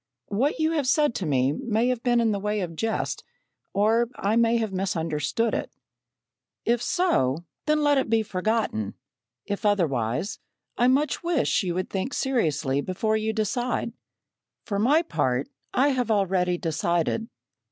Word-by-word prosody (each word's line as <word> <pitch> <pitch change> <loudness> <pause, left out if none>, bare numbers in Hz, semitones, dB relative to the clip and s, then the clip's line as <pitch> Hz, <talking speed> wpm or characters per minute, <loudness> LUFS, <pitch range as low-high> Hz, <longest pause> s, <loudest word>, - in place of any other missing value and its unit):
What 250 +9 +1
you 315 0 +1
have 300 -5 0
said 295 -1 +3
to 185 - -3
me 135 -2 +2
may 225 +8 0
have 250 -2 -1
been 240 -1 +2
in 230 -2 +2
the 200 - -1
way 210 +1 -1
of 170 -3 -4
jest, 225 +6 -2 0.5
or 225 +4 +2
I 205 +3 0
may 230 0 +4
have 220 -4 -2
misunderstood 170 +3 -1
it. - - -2 0.9
"If 235 0 +2
so, 170 - +1 0.2
then 305 0 +3
let 290 -2 +4
it 265 - -2
be 225 -1 +3
forgotten; 190 - -1 0.5
if 205 +2 -4
otherwise 165 - 0 0.4
I 245 - +3
much 280 +4 +2
wish 340 -6 +1
you 180 -3 -2
would 185 0 -3
think 195 +8 -2
seriously 155 - 0
before 215 +6 -1
you 220 0 0
decide. 230 +2 -1 0.7
For 200 -2 -2
my 290 +10 +4
part, 130 - -1 0.2
I 270 +3 +3
have 250 -4 0
already 185 -4 +2
decided. 170 +6 0
215 Hz, 155 wpm, -25 LUFS, 175-245 Hz, 0.9 s, may